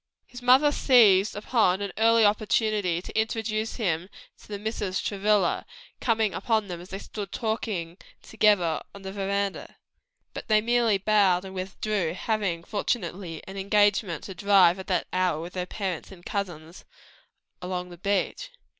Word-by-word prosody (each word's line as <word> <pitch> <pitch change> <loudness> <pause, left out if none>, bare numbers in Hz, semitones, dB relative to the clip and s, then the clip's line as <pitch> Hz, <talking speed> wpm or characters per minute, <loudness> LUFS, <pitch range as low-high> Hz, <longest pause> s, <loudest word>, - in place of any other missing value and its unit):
His 245 - -11
mother 260 +4 +5
seized 220 -8 +5
an 205 -3 +1
early 225 0 +4
opportunity 205 -4 +1
to - - -10
introduce 220 0 -1
him 180 -5 -1 0.3
to - - -17
the 205 - -5
Misses 205 -3 -3
Travilla, 200 -2 +1 0.4
coming 220 -4 +1
upon 220 0 0
them 175 -1 -6
as 180 - -13
they 190 - -5
stood 205 0 -7
talking 210 -7 -3 0.3
together 205 -7 +2
upon 200 - -14
the 190 - -5
veranda. 200 0 -3 0.6
But - - -7
they 215 -2 +4
merely 230 -1 +2
bowed 195 -2 +3
and 190 - -8
withdrew, 190 -2 -2
having, 190 -5 -2
fortunately, 180 -5 -3
an 195 +1 -8
engagement 200 -3 +1
to 190 - -7
drive, 190 -1 +4
at 190 - -8
that 185 - 0
hour, 185 -4 +1
with 170 +2 -7
their 180 -1 -3
parents 190 -4 -4
and 175 -2 -14
cousins, 175 -4 -5 0.8
along 180 0 -4
the 175 - -11
beach. 200 - -1
200 Hz, 150 wpm, -26 LUFS, 180-215 Hz, 0.8 s, mother